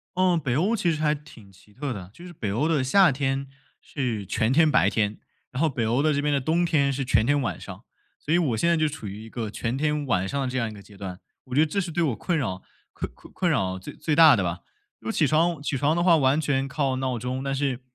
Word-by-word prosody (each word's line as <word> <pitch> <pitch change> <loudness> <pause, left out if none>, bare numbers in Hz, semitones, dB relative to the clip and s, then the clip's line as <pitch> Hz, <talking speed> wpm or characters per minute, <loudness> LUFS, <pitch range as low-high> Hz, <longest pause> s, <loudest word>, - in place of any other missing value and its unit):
嗯， 180 -2 +3
北 130 -5 -1
欧 200 - +1
其 175 -4 +1
实 155 - -4
还 150 -1 +3
挺 140 -9 -12
奇 100 +2 -22
特 135 +4 -4
的。 95 -4 -8
就 175 - -13
是 180 - -9
北 105 -12 -4
欧 135 +10 +1
的 155 -4 +2
夏 180 +6 +5
天 135 0 -1 0.3
是 120 -8 -3
全 110 +4 0
天 155 +3 +5
白 - - +4
天， 105 -1 -1 0.3
然 130 - -3
后 165 - +4
北 120 -5 -2
欧 120 +5 +1
的 155 +1 +2
这 145 - 0
边 145 0 +1
的 140 - +2
冬 165 +6 +1
天 145 -4 +2
是 135 0 -2
全 115 -4 +2
天 145 0 +2
晚 120 - -3
上。 95 +3 -10 0.4
所 155 - -2
以 - - +5
我 140 -10 +1
现 170 - +1
在 170 - +4
就 155 0 +2
处 150 -7 -6
于 100 +3 -7
一 115 - -11
个 110 -2 -4
全 115 +4 -3
天 150 0 0
晚 95 -7 0
上 140 +6 -2
的 135 - -1
这 130 +1 -3
样 115 -3 0
一 - - -9
个 100 - -11
阶 100 0 -16
段， 95 -2 -7 0.3
我 130 - -9
觉 150 - +5
得 - - 0
这 200 - -1
是 175 -2 -5
对 170 - -1
我 145 -8 +1
困 175 - -1
扰 95 -10 -3 0.3
困 - - -5
困 - - -17
困 180 -2 0
扰 95 -10 0
最 95 - -9
最 155 - -1
大 160 -3 +8
的 100 - 0
吧。 85 0 -3 0.4
因 - - -21
为 - - -1
起 - - +2
床 165 0 +2
起 145 -1 -2
床 145 +4 +2
的 170 - +1
话 175 -1 +5
完 135 0 +3
全 140 -3 0
靠 135 -1 -1
闹 130 -2 -2
钟， 125 +3 -3
但 135 0 -2
是 135 -2 -1
135 Hz, 305 characters per minute, -25 LUFS, 115-155 Hz, 0.4 s, 大